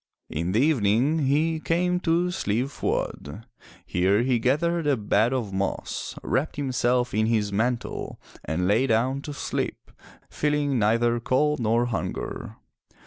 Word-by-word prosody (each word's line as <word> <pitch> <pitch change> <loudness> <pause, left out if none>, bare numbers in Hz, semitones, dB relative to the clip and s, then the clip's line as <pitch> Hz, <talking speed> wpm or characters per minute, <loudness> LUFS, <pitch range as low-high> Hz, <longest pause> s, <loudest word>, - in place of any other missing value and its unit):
In 85 +4 -2
the 110 - +3
evening 135 +2 +2
he 160 +3 +1
came 180 +3 +1
to 175 +1 +1
Slieve 125 -3 -1
Fuad. 90 - -3 0.4
Here 95 +5 +2
he 125 -2 +2
gathered 155 +7 +1
a 140 -3 +3
bed 105 +2 +2
of 120 -7 -2
moss, 95 +1 -3
wrapped 150 +4 -1
himself 125 -3 0
in 110 +1 +2
his 105 -3 0
mantle 120 +3 -2 0.2
and 90 +3 -1
lay 110 +7 +3
down 130 +4 +1
to 150 - -7
sleep, 145 - -4 0.4
feeling 145 -3 0
neither 115 +2 +2
cold 150 +5 +1
nor 115 +1 +2
hunger. 115 -5 -4
125 Hz, 140 wpm, -25 LUFS, 110-145 Hz, 0.4 s, the